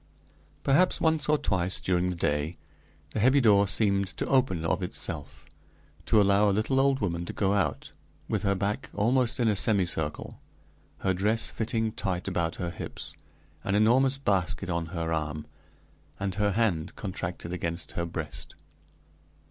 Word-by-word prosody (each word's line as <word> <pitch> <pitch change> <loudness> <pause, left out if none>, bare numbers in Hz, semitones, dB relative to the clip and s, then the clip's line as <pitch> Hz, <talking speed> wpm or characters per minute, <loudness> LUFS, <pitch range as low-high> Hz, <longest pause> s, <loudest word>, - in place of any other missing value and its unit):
Perhaps, 155 +7 +4
once 160 -2 +2
or 150 - +4
twice 95 -7 0
during 90 0 0
the 90 - -2
day, 75 +1 -1 0.5
the - - -3
heavy 130 +6 +5
door 100 -5 +5
seemed 100 -2 +2
to - - -1
open 125 -12 +1
of 85 +4 0
itself, 85 -4 -4 0.6
to 110 - +5
allow 100 +1 +4
a - - +3
little 110 +7 +1
old 135 -1 +2
woman 85 -4 -1
to - - -6
go 100 -1 +1
out, 100 -2 -1 0.4
with 105 - -1
her 100 -1 +1
back 105 +7 -2
almost 120 +4 +1
in 120 - +2
a 105 - +2
semicircle, 90 -7 0 0.6
her 95 - +1
dress 105 +5 0
fitting 110 0 -1
tight 95 -2 -3
about 85 -3 -1
her 90 -2 -4
hips, - - -6 0.5
an 95 - 0
enormous 130 +6 +4
basket 100 -6 0
on 85 -1 -2
her 80 -1 -3
arm, 75 -1 -3 0.7
and 100 -1 -2
her 105 0 +1
hand 90 -7 0
contracted 90 -3 -5
against 85 -1 -3
her 85 0 -3
breast. 80 -2 -6
100 Hz, 155 wpm, -28 LUFS, 85-110 Hz, 0.7 s, heavy